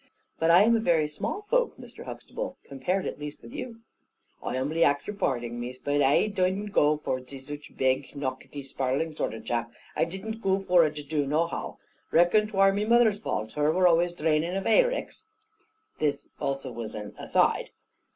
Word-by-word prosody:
"But 165 - +2
I 175 +4 +8
am 230 +2 +5
a - - +2
very 165 -7 +2
small 150 - -4
folk, - - +1
Mr. - - -11
Huxtable, - - -6
compared 180 +8 -2
at - - -4
least 150 0 -7
with 235 - -11
you." 240 -6 -7 0.6
"I - - -3
humbly 155 +6 +1
ax 145 -1 +2
your 210 - -5
parding, 120 - -1
Miss, 125 +1 -5
but 145 +2 0
ai 140 +7 +4
didn't 200 0 -1
goo 150 -4 +4
for 130 - 0
to 130 +2 -11
be - - -7
zuch 145 +2 -9
a - - -22
beg, 130 0 +1
nockety, 140 +1 -5
sprarling 135 +4 -2
zort 115 - -2
of 110 - -9
a - - -22
chap. 115 0 -2 0.2
I - - +2
didn't 205 +6 -6
goo 190 -2 +2
for 180 -4 +4
to 150 0 -8
do 150 +1 -1
it 140 - -2
nohow. 160 +4 -1 0.3
Reckon 175 +6 +4
'twar 195 -2 +4
my 205 +1 0
moother's 230 -2 +4
valt, 110 - -3
her 150 +3 +2
were 180 +2 +4
always 175 +1 +3
draining 160 +2 0
of 195 - -1
hayricks." - - +1 0.7
This 150 -2 -1
also 135 -2 -2
was 115 -2 -6
an 105 -1 -6
"aside." - - +2
155 Hz, 200 wpm, -27 LUFS, 135-195 Hz, 0.7 s, I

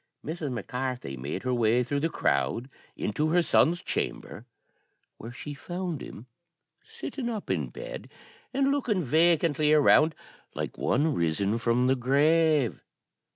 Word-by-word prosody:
Mrs. 155 -2 -4
Mac 115 -5 -4
Carthy 125 - -4
made 70 +3 -5
her 130 -1 0
way 120 +1 +3
through 140 +4 -2
the 165 +3 0
crowd 130 -4 -1 0.3
into 150 +9 -1
her 175 +2 +3
son's 170 +1 +3
chamber, 115 - -4 0.7
where 115 - -8
she 145 +4 -7
found 175 +2 -5
him 110 - -9 0.6
sitting 245 -4 -6
up 220 -4 -4
in - - 0
the - - -13
bed, - - -8 0.4
and 275 +1 +2
looking 240 -10 0
vacantly 155 0 +3
around, 155 +1 +5 0.4
like - - -4
one 150 +4 +1
risen 100 +6 0
from 120 +2 +2
the 130 +1 +3
grave. 145 +1 +2
145 Hz, 145 wpm, -27 LUFS, 120-165 Hz, 0.7 s, around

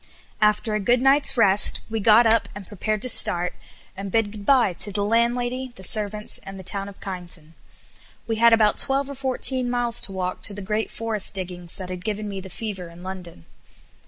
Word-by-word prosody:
After 210 +1 +1
a 215 - 0
good 240 +5 +1
night's 270 +1 +3
rest 205 -3 +5
we 225 0 -4
got 220 +3 +5
up 225 0 +2
and 205 -1 -9
prepared 215 +1 -4
to - - -1
start, 180 -5 +4 0.4
and 195 0 -7
bid 225 -1 0
goodbye 215 0 +1
to 205 +3 +1
the 200 0 -1
landlady, 240 +3 -1
the 190 - -14
servants, 210 +2 0
and 195 0 -11
the 190 - -10
town 195 +2 +2
of 200 - -15
Kyneton. 175 -4 -6 0.7
We 225 -1 -3
had 235 +1 +5
about 215 -2 +3
twelve 275 +1 +1
or - - -6
fourteen 260 -1 -1
miles 240 -1 +1
to - - -2
walk 185 -1 -4
to 205 - 0
the 205 - -7
great 210 +3 -2
forest 220 -3 +2
diggings 180 -2 -6
that 185 -1 -8
had 180 0 -7
given 215 -1 -4
me 195 -2 -6
the 190 - -11
fever 190 -3 -6
in 170 +1 -14
London. 180 - -9
210 Hz, 200 wpm, -22 LUFS, 190-235 Hz, 0.7 s, rest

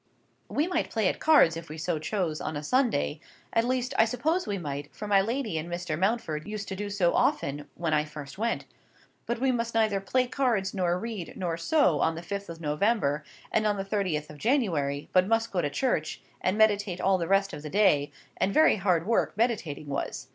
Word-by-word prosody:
We 300 - +1
might 360 - -1
play 220 -4 +1
at - - -4
cards, 300 - +5
if 165 -1 -8
we 155 - -7
so 165 0 -1
chose, 165 -2 -2
on 155 - -3
a 145 - -5
Sunday; 225 - +1 0.3
at 230 - +3
least, 255 +1 -1
I 225 - +7
suppose 315 +10 0
we 205 - -1
might, 145 -4 -5
for 210 - -7
my 200 -1 +5
lady 225 -5 -2
and 165 +2 -6
Mr. 175 -2 -3
Mountford 185 -4 -1
used 210 -1 -5
to 190 - -3
do 205 +1 -4
so 190 -4 +2
often 145 +1 0
when 165 -2 -1
I 150 0 +3
first 150 +1 -9
went. 230 +1 -1 0.6
But 235 - -1
we 265 +1 +2
must 230 -2 -2
neither 215 -3 +2
play 255 +6 +1
cards, 240 -7 0
nor 180 -2 +1
read, 215 -4 -5
nor 175 -4 -1
sew 170 - +2
on 160 - +1
the 165 - -7
fifth 200 +1 -5
of 165 -1 -7
November 150 -1 +1 0.3
and 215 -1 +2
on 205 -1 +1
the 195 - -3
thirtieth 185 -8 -1
of 150 - -13
January, 165 - 0
but 185 0 +4
must 225 +1 +1
go 180 - +1
to 145 - -1
church, 155 - -1 0.2
and 185 +3 0
meditate 205 -4 +2
all 190 0 +2
the 170 - -2
rest 195 0 +2
of - - -6
the 150 - -6
day—and 145 -2 +1
very 310 0 +5
hard 180 -4 +1
work 225 -2 +1
meditating 210 -11 -1
was. 140 -1 -4
195 Hz, 210 wpm, -28 LUFS, 155-225 Hz, 0.6 s, I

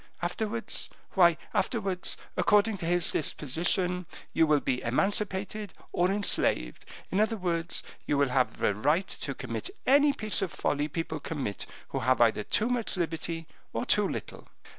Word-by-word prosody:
Afterwards, 220 +6 -1 0.2
why 170 -4 +5 0.2
afterwards, 190 -1 -1 0.2
according 210 0 +3
to 170 -3 -4
his 175 0 +3
disposition, 175 +5 0 0.3
you 160 - +4
will 150 -1 +4
be 125 -2 -1
emancipated 195 - -1 0.2
or 180 +1 +2
enslaved; 195 - +1 0.3
in 190 - +1
other 220 +1 +2
words, 170 -3 -1 0.2
you 145 - +2
will 140 -1 +3
have 125 0 0
a - - +3
right 150 - +1
to - - -3
commit - - -4 0.2
any 285 +2 +6
piece 215 -6 -1
of 190 - -1
folly 145 +1 0
people 160 0 -3
commit 140 -9 -4 0.2
who - - -2
have 130 0 +2
either 110 -2 +4
too 215 - +1
much 240 -5 -1
liberty 165 -1 -2 0.3
or - - -2
too - - +3
little. - - -6
175 Hz, 155 wpm, -29 LUFS, 150-200 Hz, 0.3 s, any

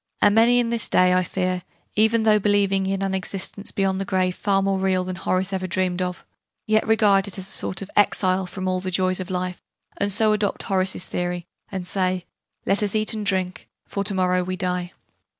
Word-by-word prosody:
And 205 - +5
many 230 +3 +5
in 240 -1 +2
this 235 -2 +1
day, 180 0 +4
I 185 - +4
fear, 185 0 -2 0.3
even 220 +1 +3
though 215 -1 +5
believing 195 -1 +2
in 195 0 -1
an 195 -1 -1
existence 195 +1 -3
beyond 195 -2 0
the - - 0
grave 185 -2 0
far 195 -1 +1
more 195 -1 +1
real 190 -1 +1
than 185 0 -4
Horace 185 +1 -1
ever 185 -1 -2
dreamed 185 0 -1
of, 180 -1 -4 0.4
yet 215 0 +2
regard 205 -3 +4
it 200 - -5
as 190 0 -5
a - - -8
sort 190 +1 -2
of 195 - -11
'exile' 190 -2 +2
from 185 +1 -5
all 185 0 0
the 185 0 -4
joys 185 0 0
of 185 0 -5
life, 180 -1 -3 0.4
and 200 0 0
so 215 +1 +3
adopt 210 -2 -1
Horace's 185 -1 0
theory, 175 -1 -3 0.3
and 190 -2 -4
say 185 -1 -1 0.4
'let 195 +2 +2
us 205 0 0
eat 215 +1 +1
and 215 -1 -3
drink, 185 -2 -1 0.2
for 200 - -2
to 200 -1 -1
morrow 180 -1 +2
we 185 +1 -3
die.' 180 -1 -2
190 Hz, 215 wpm, -23 LUFS, 185-205 Hz, 0.4 s, And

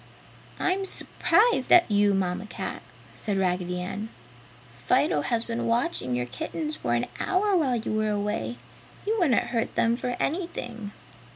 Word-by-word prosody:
"I'm 370 +1 +1
s'prised 415 - +2
at 350 -10 +7
you, 205 -1 +4
Mamma 190 +2 -1
Cat!" - - -5 0.3
said 205 -3 -2
Raggedy 180 -1 0
Ann, 200 +4 -4 0.6
"Fido 125 +4 +2
has 225 +9 0
been 230 0 -3
watching 230 - 0
your 125 0 -1
kittens 150 +5 -4
for 120 -4 -1
an 120 - +1
hour 390 +1 +2
while 280 -8 +2
you 225 -1 -2
were 215 0 +1
away. 210 +3 -2 0.5
He 430 - +1
wouldn't 290 -10 +4
hurt 230 -3 -1
them 230 +1 +3
for 245 0 -3
anything!" 245 - -3
220 Hz, 150 wpm, -27 LUFS, 180-260 Hz, 0.6 s, at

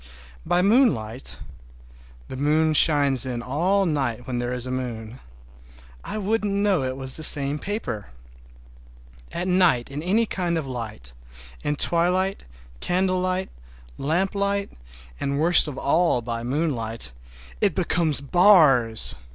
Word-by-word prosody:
By 180 +1 +2
moonlight—the - - -3
moon 155 +3 +1
shines 145 -5 +5
in 120 -2 -3
all 180 +10 +1
night 135 -7 -2
when 125 -1 -3
there 120 0 -3
is 125 0 -3
a 130 - -4
moon—I 60 - -9
wouldn't 210 0 -1
know 200 -4 +1
it 130 0 -3
was 130 -1 -2
the 155 - -6
same 145 0 +3
paper. 200 - -5 1.2
At 175 +2 -4
night 180 -10 +2
in 145 +2 -5
any 205 +7 +1
kind 175 -5 -2
of 160 - -3
light, 110 - -7 0.5
in 150 - -1
twilight, 180 +5 +1 0.3
candlelight, 185 - -1 0.5
lamplight, 200 +5 -1 0.5
and 140 0 -2
worst 170 +1 +4
of 140 -3 -6
all 155 -4 +1
by 115 0 -4
moonlight, 120 - -3 0.5
it - - +2
becomes 160 -5 +1
bars! 140 - +4
145 Hz, 120 wpm, -23 LUFS, 120-180 Hz, 1.2 s, shines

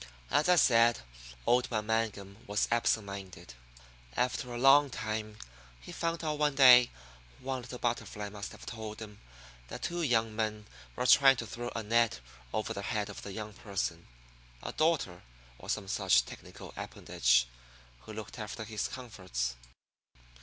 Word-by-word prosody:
As 155 - +3
I 180 - +7
said, 115 - +5 0.4
old 125 +1 +3
man 110 -3 -1
Mangum 105 -3 -2
was 105 +1 +1
absent 115 -2 +2
minded. 95 -10 -9 0.6
After 125 0 0
a 120 - -4
long 135 +3 +6
time 110 -2 -4 0.4
he - - -11
found 165 0 -2
out 150 -1 -2
one 150 -2 +2
day 125 -3 +8 0.5
a 130 - -14
little 125 -1 -4
butterfly 105 -3 -3
must 105 0 -7
have - - -12
told 110 -2 -7
him 105 -2 -10 0.5
that - - -8
two 175 0 -2
young 115 -7 +1
men 110 -1 -2 0.3
were 125 - -2
trying 135 +1 +7
to 115 - -5
throw 120 +2 -6
a 115 - -2
net 115 - +2 0.3
over 110 - -2
the 100 - -5
head 105 0 -2
of - - -9
the 100 - -7
young 105 +1 -6
person, 95 -6 -4 0.6
a - - -4
daughter, 155 - 0 0.4
or - - -11
some 105 -3 -1
such 95 - +3
technical - - -11
appendage, - - +1 0.5
who 110 - -11
looked 110 +3 -8
after 110 +1 -5
his 110 -1 -3
comforts. 95 - -4
110 Hz, 160 wpm, -31 LUFS, 105-125 Hz, 0.6 s, day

